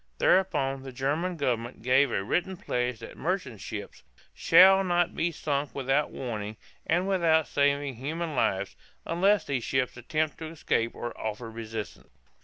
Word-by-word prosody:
Thereupon 135 - +2
the 135 0 -8
German 150 +8 -1
government 120 -5 -2
gave 130 +3 +4
a 95 - -1
written 180 - -1
pledge 125 -6 -2
that 115 - -9
merchant 160 - -3
ships - - -7 0.3
"shall 190 +1 +6
not 175 -1 +1
be 170 +1 0
sunk 145 -2 -2
without 135 +2 +1
warning 110 -4 -5 0.3
and 175 +3 +1
without 165 -5 +3
saving 140 -2 +1
human 155 +4 -3
lives, 100 -5 0 0.3
unless 190 +3 +2
these 130 -4 -2
ships 130 0 -1
attempt 155 +5 -2
to 160 - -5
escape 140 -7 -1
or 120 - -5
offer 110 +1 -5
resistance." 110 -1 -7
140 Hz, 150 wpm, -28 LUFS, 120-170 Hz, 0.3 s, shall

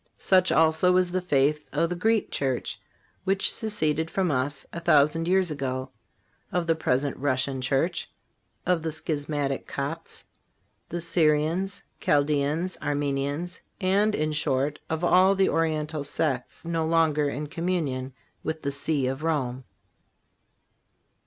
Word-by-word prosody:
Such 185 -1 +3
also 160 +3 +4
is 180 -1 +2
the 185 +1 0
faith 150 -3 +1
of 165 +3 0
the - - -1
Greek 220 +4 +1
church, 130 -3 -2 0.4
which 195 +1 +1
seceded 160 -8 -1
from 185 -2 0
us 140 +2 -1
a 170 - -4
thousand 165 0 +3
years 185 -2 +3
ago, 130 -2 -3 0.6
of 180 -1 0
the 165 - +3
Present 140 -3 0
Russian 130 -1 0
church, 140 +7 0 0.6
of 180 -2 +2
the 160 0 -2
schismatic 145 -3 -2
Copts, 150 +4 -5 0.6
the 175 - -3
Syrians, 165 +3 +1 0.2
Chaldeans, 150 +4 +1
Armenians, 145 +4 -2 0.2
and, 205 +2 +2
in 155 +1 0
short, 145 -1 0
of 160 +2 -2
all 185 +2 +5
the 195 0 +3
Oriental 155 -2 0
sects 140 -1 -2
no 165 -1 -1
longer 160 -2 +2
in 145 +2 -4
communion 150 -6 -2 0.3
with 160 0 -4
the 140 - -1
See 140 0 0
of 135 +3 -2
Rome. 130 -6 -1
155 Hz, 135 wpm, -26 LUFS, 140-175 Hz, 0.6 s, all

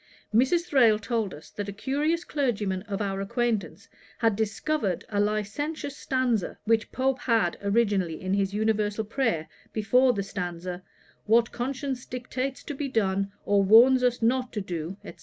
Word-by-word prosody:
Mrs. 265 +10 +4
Thrale 240 -9 +5
told 215 -1 -2
us, 150 -1 -12
that 205 -1 -5
a - - -3
curious 295 - -1
clergyman 210 - -1
of 200 0 -2
our 195 -1 -2
acquaintance 200 -6 -2 0.3
had 225 -3 +2
discovered 215 - -1
a 205 - -1
licentious 215 +9 -2
stanza, 255 -8 -1
which 225 0 +1
Pope 260 0 0
had 225 -8 +1
originally 200 -5 +1
in 185 +1 -2
his 195 -1 +1
Universal 215 0 0
Prayer, 215 - -1 0.3
before 250 +4 +4
the 200 -3 -2
stanza, 180 -2 -5 0.5
'What 230 +2 +4
conscience 260 +1 -4
dictates 255 +2 -4
to 295 - -5
be 280 0 -3
done, 195 -5 0
Or 200 0 +3
warns 235 +6 +7
us 245 -2 +1
not 250 +2 +1
to 210 - -2
do,' 175 0 -5
&c. - - -8
220 Hz, 160 wpm, -27 LUFS, 200-255 Hz, 0.5 s, warns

